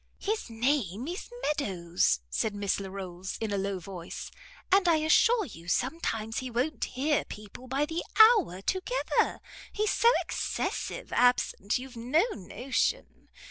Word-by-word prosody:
"His 430 - -2
name 230 - 0
is 355 +4 -5
Meadows," 180 - +1
said 210 - 0
Miss 200 -1 0
Larolles, 190 -2 -6
in 220 -2 -2
a - - 0
low 195 0 -2
voice, 180 -1 -7 0.4
"and 385 -1 +5
I 335 - +6
assure 400 +9 +4
you 170 - -12
sometimes 225 - -1
he 260 - -5
won't 245 +2 -1
hear 285 +4 0
people 210 +4 -10
by 275 +3 +1
the 325 +3 -3 0.2
hour 430 - +6
together. 385 - 0 0.3
He's 425 0 0
so 465 - +5
excessive - - -3
absent 245 -5 +2
you've 255 0 -9
no 250 +9 +2
notion. 250 +7 -2
245 Hz, 140 wpm, -29 LUFS, 195-315 Hz, 0.4 s, I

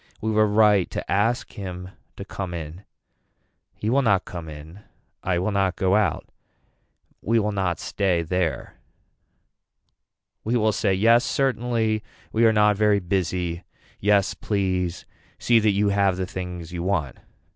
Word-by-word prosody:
We 110 - -2
were 110 0 +3
right 105 -3 +4
to - - -5
ask 115 +5 +1
him 90 -2 -7 0.3
to 100 - -7
come 95 -3 -5
in. 85 +4 -8 0.9
He 105 - -5
will 130 +5 +3
not 100 -7 +2
come 85 -3 -7
in. 75 +5 -11 0.4
I 90 -2 0
will 95 +4 -1
not 95 -2 +1
go 95 0 +1
out. 105 -2 0 0.9
We 115 +3 +1
will 105 -1 +1
not 95 -4 -1
stay 90 -4 0
there. 85 -4 -2 1.7
We 120 +3 +1
will 110 -1 +2
say 100 -1 0
yes 115 +5 +4
certainly, 120 -5 0 0.3
we 115 +1 +3
are - - +5
not 105 -1 +3
very 105 -1 +3
busy. 90 -2 -2 0.4
Yes 100 -1 +2
please 95 -4 -2 0.3
see 120 -1 +3
that 110 -1 +2
you 100 +1 +2
have 100 -2 +2
the 95 - -2
things 90 -2 -6
you 85 - -4
want. 85 -8 -1
100 Hz, 150 wpm, -24 LUFS, 90-105 Hz, 1.7 s, are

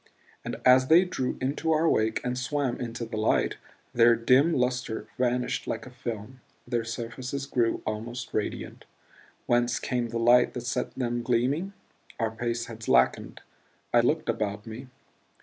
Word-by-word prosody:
And - - -4
as 130 0 +6
they 170 +5 +6
drew 130 -8 -2
into 140 +5 -1
our 160 +1 +3
wake 110 -6 +1
and 125 0 -1
swam 135 0 -1
into 120 -1 -4
the 110 -1 -6
light, 110 - +1 0.4
their 120 0 +6
dim 130 +8 +4
lustre 125 -4 -1
vanished 125 0 0
like - - -3
a 130 - -11
film; 120 +1 -7 0.3
their 120 -2 0
surfaces 120 +4 -5
grew 120 -4 0
almost 120 +3 -5
radiant. 105 - -4 0.6
Whence 120 0 +2
came 120 -2 -2
the 115 - -3
light 120 +1 +4
that 125 - -3
set 125 0 -2
them 120 -2 -1
gleaming? 130 +11 0 0.5
Our 115 -1 0
pace 115 +1 -2
had 115 -1 -10
slackened 60 - +2 0.5
I 120 - +6
looked 150 +7 +1
about 105 -3 -2
me. 115 +4 -8
120 Hz, 155 wpm, -27 LUFS, 115-130 Hz, 0.6 s, as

